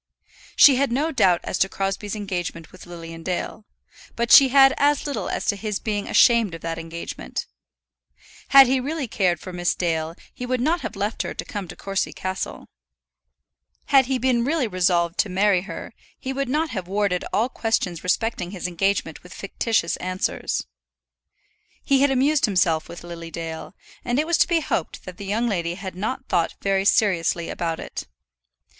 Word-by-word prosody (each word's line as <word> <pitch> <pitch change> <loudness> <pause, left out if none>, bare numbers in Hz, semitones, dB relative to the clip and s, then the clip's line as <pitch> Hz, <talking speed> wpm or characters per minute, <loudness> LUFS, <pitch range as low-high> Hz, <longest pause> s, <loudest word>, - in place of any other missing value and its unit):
She 275 -3 +8
had 275 -2 +1
no 295 +6 0
doubt 185 - +3
as - - -3
to 195 - +3
Crosbie's 195 +2 -3
engagement 175 -5 -4
with 185 -1 -14
Lilian 165 -1 -9
Dale, 185 +4 -4 0.5
but 235 0 -1
she 275 - +10
had 270 0 +6
as 290 0 +2
little 285 -2 -3
as - - -3
to 205 - +1
his 210 0 -3
being 205 -2 -3
ashamed 230 -7 +4
of 165 - -10
that 165 0 -4
engagement. 165 +1 -6 1.0
Had 275 -1 +9
he 260 +1 +2
really 285 +1 -3
cared 180 -6 +1
for 185 - -9
Miss 175 -1 0
Dale 165 -2 -1 0.2
he 250 - -8
would 250 0 -1
not 320 +7 +1
have - - -5
left 205 +3 -2
her - - -5
to - - -5
come 205 -3 -5
to - - -9
Courcy 195 0 -2
Castle. 185 0 -5 1.3
Had 265 -2 +6
he 265 -1 +1
been 250 -1 +1
really 285 -1 0
resolved 175 -3 +1
to 210 - +2
marry 190 0 +2
her, - - -7 0.2
he 265 0 -4
would 275 -1 -2
not 305 +3 0
have 190 -5 -4
warded 195 -2 0
all 225 +3 +2
questions 220 -9 -2
respecting 185 -1 -1
his 185 -2 -7
engagement 180 -2 -1
with 180 - -13
fictitious 200 -2 -1
answers. 185 +1 -2 1.2
He 275 -1 +3
had 285 - +5
amused 270 +3 +3
himself 180 -6 +1
with 170 - -9
Lily 170 -1 -8
Dale, 165 +2 -7 0.3
and 245 +1 -1
it 300 - +2
was 340 0 +1
to - - +5
be 340 -2 +2
hoped 190 - -3
that 185 -1 -9
the 200 - -8
young 225 +4 0
lady 175 -5 -1
had 190 0 -7
not 255 +8 -4
thought 170 -2 0
very 195 -1 0
seriously 175 -5 +2
about 165 -2 -3
it. - - -7
200 Hz, 180 wpm, -23 LUFS, 175-255 Hz, 1.3 s, she